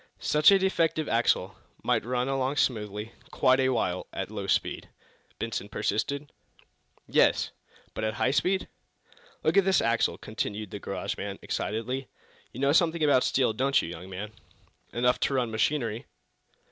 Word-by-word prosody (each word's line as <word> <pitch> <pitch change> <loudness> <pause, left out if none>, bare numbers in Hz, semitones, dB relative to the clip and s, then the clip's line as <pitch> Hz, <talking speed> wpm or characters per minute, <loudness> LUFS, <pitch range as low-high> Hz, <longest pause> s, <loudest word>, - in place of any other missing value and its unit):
"Such 150 0 +4
a 200 - +7
defective 165 -5 +1
axle 115 +1 +1 0.3
might - - +1
run 125 +2 -1
along 135 0 0
smoothly, 105 -4 -1 0.2
quite 130 +1 +3
a 130 0 +3
while 95 -8 -1
at 95 +2 -5
low 100 -2 -5
speed?" - - 0 0.5
Benson 110 -2 -4
persisted. 140 +9 -2 0.8
"Yes." - - +3 0.4
"But - - -4
at 110 0 -1
high 130 - +1
speed 185 +6 +1 0.4
?" - - -28
"Look - - +2
at 200 - +7
this 190 0 +3
axle!" 115 0 +1
continued 105 -2 -4
the - - -5
garage - - -4
man, - - -5
excitedly. 125 +5 -3 0.4
"You 125 - -9
know 140 +1 +3
something 165 +1 +3
about 140 -4 +4
steel, 125 -4 +2
don't 135 +5 +2
you, - - -3
young 85 +2 -8
man?" 100 +3 -6 0.6
"Enough 125 +1 +2
to 135 - 0
run 120 -3 0
machinery." 115 0 -1
125 Hz, 160 wpm, -28 LUFS, 110-145 Hz, 0.8 s, a